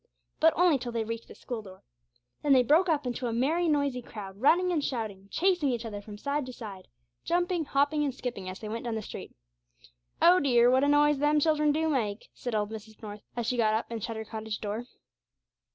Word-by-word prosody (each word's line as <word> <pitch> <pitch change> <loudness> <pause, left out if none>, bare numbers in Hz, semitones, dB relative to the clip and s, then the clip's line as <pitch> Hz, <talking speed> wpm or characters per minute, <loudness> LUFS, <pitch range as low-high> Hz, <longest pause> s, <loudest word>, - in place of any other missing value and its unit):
But 320 +1 +5
only 340 -5 +4
till 245 -1 -5
they 230 -1 -1
reached 230 +1 -5
the - - -12
school 240 -3 -5
door. 190 -2 -14 0.6
Then 290 -2 +4
they 255 -1 +6
broke 325 +9 +4
up 295 -4 +1
into 250 0 -2
a - - -1
merry 310 +9 +1
noisy 285 -4 +1
crowd, 200 -3 -9
running 360 +6 +4
and 315 -4 0
shouting, 215 -7 -4
chasing 355 - +2
each 240 -2 -2
other 205 -2 -5
from 205 0 -10
side 280 +4 -2
to 255 - -7
side, 200 -6 -9 0.4
jumping, 350 -1 0
hopping, 285 +2 +1
and 285 - 0
skipping 240 -7 -5
as 185 - -6
they 215 - -8
went 225 +2 -4
down 235 -2 -2
the 220 - -3
street. - - -9 0.8
'Oh 350 +2 +6
dear, 245 -4 +4
what 260 +1 +4
a - - +3
noise 295 0 +4
them 295 +1 +3
children 300 -1 +3
do 320 +2 +1
make!' 225 -8 -1
said 245 -3 -4
old 210 0 -1
Mrs. 220 0 -9
North, 205 -1 -7
as 240 -1 -2
she 245 +2 0
got 215 -2 +3
up 220 - -1
and 225 -3 -4
shut 230 - -3
her 220 0 -5
cottage 220 -1 -5
door. 215 +3 -4
245 Hz, 225 wpm, -29 LUFS, 220-295 Hz, 0.8 s, they